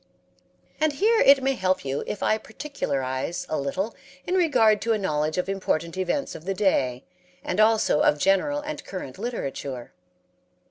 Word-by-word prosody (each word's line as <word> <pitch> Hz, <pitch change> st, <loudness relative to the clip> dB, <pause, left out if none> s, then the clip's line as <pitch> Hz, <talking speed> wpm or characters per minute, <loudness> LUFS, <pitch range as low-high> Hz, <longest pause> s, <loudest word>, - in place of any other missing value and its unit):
And 310 Hz, -1 st, +2 dB
here 440 Hz, +9 st, +3 dB
it 275 Hz, -1 st, +6 dB
may 270 Hz, +1 st, +2 dB
help 185 Hz, -, 0 dB
you 135 Hz, +1 st, -2 dB
if 205 Hz, -, -4 dB
I 215 Hz, -, +2 dB
particularize 145 Hz, -, -3 dB
a 155 Hz, -, -1 dB
little 185 Hz, +11 st, -2 dB, 0.3 s
in 360 Hz, -, -2 dB
regard 235 Hz, -, +4 dB
to 230 Hz, -, +1 dB
a -, -, +1 dB
knowledge 155 Hz, -5 st, -1 dB
of 180 Hz, -, 0 dB
important 170 Hz, -4 st, -1 dB
events 190 Hz, +10 st, -1 dB
of 155 Hz, -, -10 dB
the 195 Hz, 0 st, -2 dB
day 130 Hz, -11 st, +1 dB, 0.4 s
and 180 Hz, -, -2 dB
also 215 Hz, -7 st, +4 dB
of 150 Hz, -, +4 dB
general 195 Hz, -, +2 dB
and 300 Hz, 0 st, -6 dB
current 185 Hz, -5 st, -7 dB
literature. 140 Hz, -, -5 dB
195 Hz, 165 wpm, -25 LUFS, -, 0.4 s, it